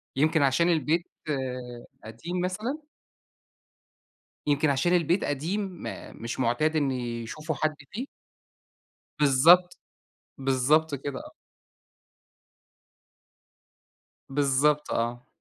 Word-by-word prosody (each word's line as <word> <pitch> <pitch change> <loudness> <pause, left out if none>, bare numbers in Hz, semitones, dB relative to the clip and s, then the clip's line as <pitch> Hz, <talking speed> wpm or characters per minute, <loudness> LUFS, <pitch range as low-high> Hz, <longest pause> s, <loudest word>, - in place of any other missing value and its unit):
يمكن 155 +3 +3
عشان 140 +5 +3
البيت 165 +1 +1 0.2
آآ، 125 -3 -4 0.2
قديم 165 +12 -5
مثلًا؟ 235 +12 -3 1.6
يمكن 145 +1 +2
عشان 140 +6 +2
البيت 175 +2 +2
قديم، 160 +9 -1
ما 190 -4 -7
مش 115 +2 -6
معتاد 130 +6 +1
إن 145 -3 +2
يشوفوا 125 +5 -4
حد 155 +1 0 0.2
فيه؟ 245 +7 -5 1.1
بالضبط، 165 +6 +5 0.6
بالضبط 135 +4 +2
كده 140 0 -4
آه. - - -10 3.0
بالضبط 145 +2 +2
آه. 120 +2 -2
145 Hz, 90 wpm, -27 LUFS, 130-170 Hz, 3.0 s, بالضبط